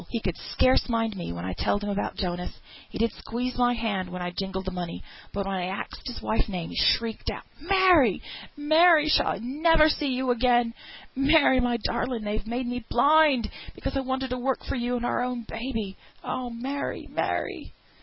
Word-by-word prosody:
He 230 Hz, -, -2 dB
could 185 Hz, -5 st, -2 dB, 0.2 s
scarce 255 Hz, 0 st, +3 dB
mind 225 Hz, -2 st, 0 dB
me 175 Hz, -, -5 dB
when 85 Hz, +1 st, -5 dB
I 95 Hz, -, -3 dB
telled 205 Hz, -, 0 dB
him 205 Hz, -, -2 dB
about 200 Hz, 0 st, -2 dB
Jonas; 180 Hz, -2 st, -3 dB, 0.4 s
he -, -, -7 dB
did 230 Hz, 0 st, +1 dB
squeeze 245 Hz, +2 st, -4 dB
my 245 Hz, 0 st, +2 dB
hand 205 Hz, -6 st, -2 dB
when 180 Hz, 0 st, -6 dB
I 175 Hz, -, -3 dB
jingled 190 Hz, +1 st, -4 dB
the 190 Hz, -, -3 dB
money, 175 Hz, -2 st, -5 dB, 0.3 s
but 200 Hz, -1 st, -3 dB
when 195 Hz, 0 st, -2 dB
I 180 Hz, -1 st, -2 dB
axed 195 Hz, +7 st, -6 dB
his 245 Hz, -, -6 dB
wife's 220 Hz, -, 0 dB
name 180 Hz, -4 st, -4 dB
he -, -, -8 dB
shrieked 225 Hz, -1 st, +1 dB
out, -, -, -5 dB, 0.2 s
'Mary, 350 Hz, -, +4 dB, 0.4 s
Mary, 310 Hz, +1 st, +5 dB
shall -, -, +4 dB
I -, -, 0 dB
never 310 Hz, +6 st, +4 dB
see 300 Hz, -1 st, 0 dB
you 260 Hz, -1 st, 0 dB
again? 240 Hz, -1 st, +2 dB, 0.4 s
Mary, 275 Hz, -1 st, +5 dB
my 245 Hz, -1 st, +1 dB
darling, 245 Hz, -3 st, -1 dB
they've 210 Hz, +1 st, -3 dB
made 245 Hz, +2 st, -2 dB
me 245 Hz, 0 st, -3 dB
blind 285 Hz, -2 st, +4 dB, 0.2 s
because -, -, -4 dB
I -, -, +2 dB
wanted 265 Hz, 0 st, -2 dB
to 250 Hz, -, -2 dB
work 265 Hz, +1 st, -1 dB
for -, -, -2 dB
you 245 Hz, 0 st, -1 dB
and 240 Hz, 0 st, -2 dB
our -, -, 0 dB
own 250 Hz, -1 st, -2 dB
baby; 225 Hz, -5 st, -4 dB, 0.3 s
oh, 255 Hz, -1 st, -3 dB
Mary, 260 Hz, +4 st, -4 dB
Mary!' -, -, -3 dB
240 Hz, 200 wpm, -26 LUFS, 205-265 Hz, 0.4 s, Mary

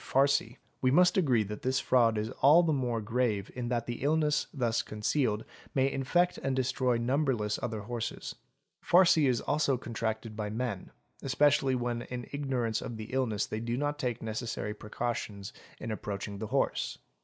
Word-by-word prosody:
farcy), 135 Hz, -3 st, +2 dB, 0.2 s
we 130 Hz, -, +3 dB
must 180 Hz, +6 st, +5 dB
agree 130 Hz, -, +3 dB
that 105 Hz, +1 st, -7 dB
this 130 Hz, +1 st, +1 dB
fraud 115 Hz, -5 st, +3 dB
is 110 Hz, +2 st, -2 dB
all 150 Hz, +6 st, +7 dB
the 160 Hz, -2 st, +2 dB
more 125 Hz, -4 st, 0 dB
grave 110 Hz, -3 st, -1 dB
in 120 Hz, -1 st, -4 dB
that 120 Hz, -1 st, -1 dB
the 120 Hz, 0 st, -5 dB
illness 150 Hz, +1 st, +2 dB
thus 120 Hz, -5 st, 0 dB
concealed 105 Hz, +1 st, -1 dB, 0.3 s
may 135 Hz, 0 st, +3 dB
infect 175 Hz, +8 st, +1 dB
and 135 Hz, -1 st, -1 dB
destroy 130 Hz, -1 st, +1 dB
number 135 Hz, +3 st, +1 dB
less 105 Hz, -2 st, -2 dB
other 110 Hz, -3 st, -3 dB
horses. 115 Hz, +2 st, -4 dB, 0.5 s
Farcy 170 Hz, -4 st, +5 dB
is 125 Hz, -3 st, +1 dB
also 145 Hz, -3 st, +1 dB
contracted 115 Hz, -2 st, -4 dB
by 105 Hz, -1 st, -3 dB
men, 110 Hz, -3 st, -3 dB, 0.3 s
especially 135 Hz, 0 st, +3 dB
when 120 Hz, -1 st, -2 dB
in 125 Hz, 0 st, -6 dB
ignorance 130 Hz, -6 st, -1 dB
of 115 Hz, -, -6 dB
the 110 Hz, +3 st, -8 dB
illness 115 Hz, -6 st, 0 dB
they 110 Hz, -, -4 dB
do 120 Hz, +1 st, -2 dB
not 145 Hz, +1 st, -1 dB
take 125 Hz, -5 st, -2 dB
necessary 110 Hz, -1 st, -3 dB
precautions 105 Hz, -2 st, -4 dB, 0.3 s
in 115 Hz, -, -5 dB
approaching 100 Hz, -1 st, -5 dB
the 110 Hz, -, -4 dB
horse. -, -, 0 dB
120 Hz, 170 wpm, -30 LUFS, 110-135 Hz, 0.5 s, all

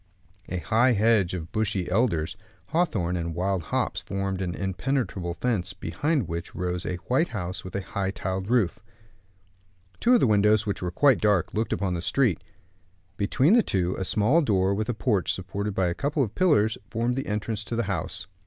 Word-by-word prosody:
A 90 Hz, -, -2 dB
high 115 Hz, +7 st, +3 dB
hedge 105 Hz, -4 st, +3 dB
of 80 Hz, -2 st, -6 dB
bushy 105 Hz, -4 st, -1 dB
elders, 95 Hz, -6 st, +1 dB, 0.3 s
hawthorn, 120 Hz, -, 0 dB
and 85 Hz, -2 st, -3 dB
wild 95 Hz, +1 st, 0 dB
hops -, -, -2 dB
formed 95 Hz, -1 st, -3 dB
an 90 Hz, -2 st, -2 dB
impenetrable 95 Hz, -3 st, -2 dB
fence, 100 Hz, 0 st, -1 dB
behind 125 Hz, -, -1 dB
which 85 Hz, +1 st, -5 dB
rose 90 Hz, 0 st, -2 dB
a 90 Hz, -, -1 dB
white 130 Hz, +8 st, +2 dB
house, 90 Hz, -5 st, -5 dB
with 95 Hz, -, -8 dB
a 100 Hz, -, -1 dB
high 95 Hz, -1 st, -2 dB
tiled 95 Hz, 0 st, -3 dB
roof. 115 Hz, -8 st, +2 dB, 1.2 s
Two 245 Hz, +1 st, +5 dB
of -, -, +5 dB
the -, -, +4 dB
windows, 105 Hz, -1 st, +4 dB
which 100 Hz, -, -2 dB
were 90 Hz, -, -1 dB
quite 135 Hz, +8 st, +3 dB
dark, 105 Hz, -5 st, +2 dB
looked 110 Hz, 0 st, -1 dB
upon 95 Hz, -3 st, 0 dB
the 85 Hz, -, -2 dB
street. 120 Hz, -1 st, +1 dB, 0.7 s
Between 130 Hz, -, +2 dB
the 240 Hz, -, +7 dB
two, 90 Hz, -, 0 dB
a 95 Hz, -, -3 dB
small 110 Hz, -, +3 dB
door, 95 Hz, -, +2 dB
with 105 Hz, +3 st, -2 dB
a 120 Hz, -, 0 dB
porch 105 Hz, -5 st, +1 dB
supported 95 Hz, +2 st, -4 dB
by 95 Hz, -, +2 dB
a -, -, -1 dB
couple 145 Hz, -, 0 dB
of 110 Hz, -4 st, -4 dB
pillars, 145 Hz, -, +3 dB
formed 120 Hz, +2 st, 0 dB
the 135 Hz, -, -3 dB
entrance 105 Hz, +1 st, -2 dB
to 115 Hz, -, -4 dB
the 115 Hz, -, 0 dB
house. -, -, -3 dB
100 Hz, 190 wpm, -26 LUFS, 90-120 Hz, 1.2 s, the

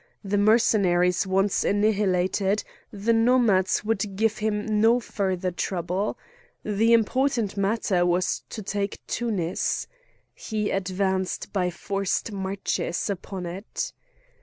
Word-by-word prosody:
The 200 Hz, 0 st, 0 dB
Mercenaries 195 Hz, -4 st, +3 dB
once 195 Hz, +1 st, +2 dB
annihilated, 200 Hz, -1 st, +1 dB, 0.3 s
the 210 Hz, +2 st, 0 dB
Nomads 225 Hz, -5 st, +3 dB
would 210 Hz, -2 st, -1 dB
give 220 Hz, +2 st, +1 dB
him 210 Hz, 0 st, 0 dB
no 230 Hz, +2 st, +5 dB
further 190 Hz, -5 st, -2 dB
trouble. 180 Hz, +3 st, -2 dB, 0.5 s
The 215 Hz, +2 st, +2 dB
important 235 Hz, -1 st, +2 dB
matter 200 Hz, -2 st, +1 dB
was 175 Hz, +1 st, +1 dB
to 215 Hz, -, -6 dB
take 200 Hz, +1 st, -3 dB
Tunis. 200 Hz, -8 st, -1 dB, 0.5 s
He 210 Hz, -1 st, -3 dB
advanced 190 Hz, 0 st, -1 dB
by 180 Hz, -3 st, +1 dB
forced 195 Hz, +4 st, -2 dB
marches 195 Hz, -1 st, -2 dB
upon 190 Hz, -1 st, -5 dB
it. 185 Hz, +5 st, -5 dB
200 Hz, 110 wpm, -25 LUFS, 185-215 Hz, 0.5 s, no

